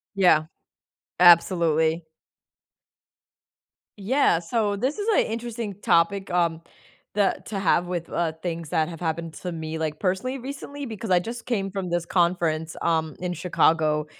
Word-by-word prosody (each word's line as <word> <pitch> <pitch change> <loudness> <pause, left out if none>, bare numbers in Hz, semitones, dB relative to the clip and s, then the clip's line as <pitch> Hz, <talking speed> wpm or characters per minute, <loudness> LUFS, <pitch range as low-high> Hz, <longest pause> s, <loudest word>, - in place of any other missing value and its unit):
Yeah, 175 -5 +4 0.8
absolutely. 170 -2 +5 1.9
Yeah, 205 -4 +2
so, 205 +4 0
this 265 - -1
is 410 - -3
a - - +2
interesting 230 -2 -4
topic, 190 +2 +2
um, 170 -2 0 0.5
that 205 -1 0
to 200 -2 -4
have 175 -1 +2
with, 175 -2 -4
uh, 170 -2 -1
things 170 -3 -4
that 160 -3 +1
have 165 -2 -8
happened 165 -1 -3
to 180 +3 -6
me, 160 -1 -5
like, 155 -1 -3
personally 195 +8 -1
recently, 280 +2 -7
because 220 -3 -6
I, 180 -1 +5
just, 235 +5 -7
came 195 -6 -1
from 190 -2 -4
this 175 -1 0
conference, 170 -3 0
um, 160 -2 0
in 180 -1 -2
Chicago, 155 -4 +2
175 Hz, 145 wpm, -25 LUFS, 165-205 Hz, 1.9 s, absolutely